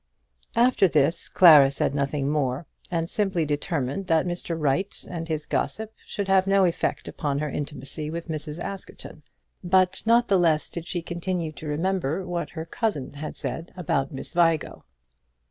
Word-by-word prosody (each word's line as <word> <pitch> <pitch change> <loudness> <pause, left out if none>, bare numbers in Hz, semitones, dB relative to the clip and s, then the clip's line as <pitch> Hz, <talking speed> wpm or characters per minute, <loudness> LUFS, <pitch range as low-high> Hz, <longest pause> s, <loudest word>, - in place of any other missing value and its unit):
After 235 -4 +4
this 160 +1 +1
Clara 150 -6 +8
said 140 0 -1
nothing 140 0 -1
more, 145 0 -1 0.3
and 165 -1 -1
simply 190 -4 0
determined 145 +2 -2
that 165 -1 +3
Mr. 175 -1 -2
Wright 160 +6 0
and 165 -2 -5
his 155 -2 -3
gossip 220 0 -2
should 200 -1 -4
have 190 0 +3
no 195 0 +4
effect 170 - -1
upon 145 -3 -2
her 150 0 -2
intimacy 150 +1 -4
with 170 +2 -5
Mrs. 155 0 -3
Askerton. 190 -5 -8 0.4
But 185 0 +3
not 235 +1 +4
the 195 -2 +3
less 160 -3 +2
did 170 0 -6
she 175 -2 -2
continue 170 -1 -3
to 155 0 -9
remember 175 +2 -1
what 175 -1 -3
her 160 - -3
cousin 165 - -2
had 150 +2 -6
said 165 +2 -3
about 140 -6 -1
Miss 135 - -3
Vigo. 165 -3 +1
165 Hz, 165 wpm, -25 LUFS, 150-185 Hz, 0.4 s, Clara